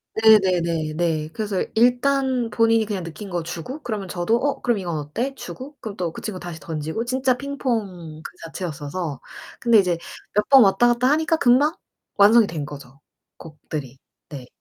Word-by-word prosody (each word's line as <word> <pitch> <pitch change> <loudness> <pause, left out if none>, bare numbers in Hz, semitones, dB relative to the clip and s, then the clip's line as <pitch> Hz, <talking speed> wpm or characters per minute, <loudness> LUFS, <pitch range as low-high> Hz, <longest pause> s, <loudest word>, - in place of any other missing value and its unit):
네 220 -1 +7
네네 170 -4 0
네. 160 -2 -1
그래서 205 -1 -2
일단 250 +1 +2
본인이 225 0 +3
그냥 200 -4 -4
느낀 180 +5 -8
거 175 -2 -2
주고 175 - -6
그러면 215 -5 -4
저도 180 +6 0
"어 280 +3 -1
그럼 240 -4 +1
이건 175 -4 -3
어때?" 225 - -3
주고 270 +3 -9
그럼 215 -3 -7
또 175 -4 -2
그 - - -9
친구 200 -4 -5
다시 175 -2 -7
던지고 160 +7 -4
진짜 255 +1 +1
핑퐁 215 - -4
그 - - -8
자체였어서 160 -2 -5 0.4
근데 235 -2 +4
이제 180 -4 +3 0.4
몇 210 +1 +1
번 270 -3 +9
왔다갔다 240 +5 +3
하니까 315 +2 +2
금방 285 +3 +3 0.4
완성이 210 +2 +6
된 155 -5 -4
거죠, 140 -2 -11 0.4
곡들이. 150 -4 -8 0.3
네. 135 -4 -8
200 Hz, 325 characters per minute, -22 LUFS, 165-240 Hz, 0.4 s, 번